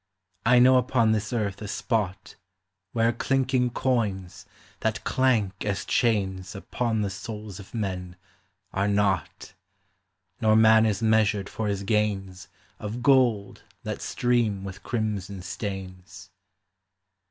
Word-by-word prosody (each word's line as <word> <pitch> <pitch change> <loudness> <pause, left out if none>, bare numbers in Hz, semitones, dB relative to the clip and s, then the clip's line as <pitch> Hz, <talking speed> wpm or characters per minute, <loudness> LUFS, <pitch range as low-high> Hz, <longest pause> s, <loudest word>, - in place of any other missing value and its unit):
I 125 +1 +6
know 130 +1 +7
upon 125 -3 +2
this 110 -1 -1
earth 105 -5 -2
a 105 - -5
spot 100 -3 -2 0.6
Where 115 0 +2
clinking 130 0 +1
coins, 100 -7 -2 0.3
that 110 +2 -1
clank 110 -7 +1
as 100 -2 -2
chains 95 -5 0
Upon 110 +2 -2
the 100 - -1
souls 105 0 -7
of 100 +3 -11
men, 90 -4 -3 0.6
are 95 +1 +1
not; 100 -5 0 0.9
Nor 110 -1 +4
man 110 0 +6
is 110 +1 -1
measured 110 -2 +2
for 110 - -3
his 100 -1 -2
gains 95 -3 -1 0.3
Of 110 +3 -5
gold 125 -8 +3 0.2
that - - -4
stream 120 -5 0
with 95 0 -8
crimson 100 -5 -3
stains. 95 -1 -7
105 Hz, 120 wpm, -26 LUFS, 95-115 Hz, 0.9 s, know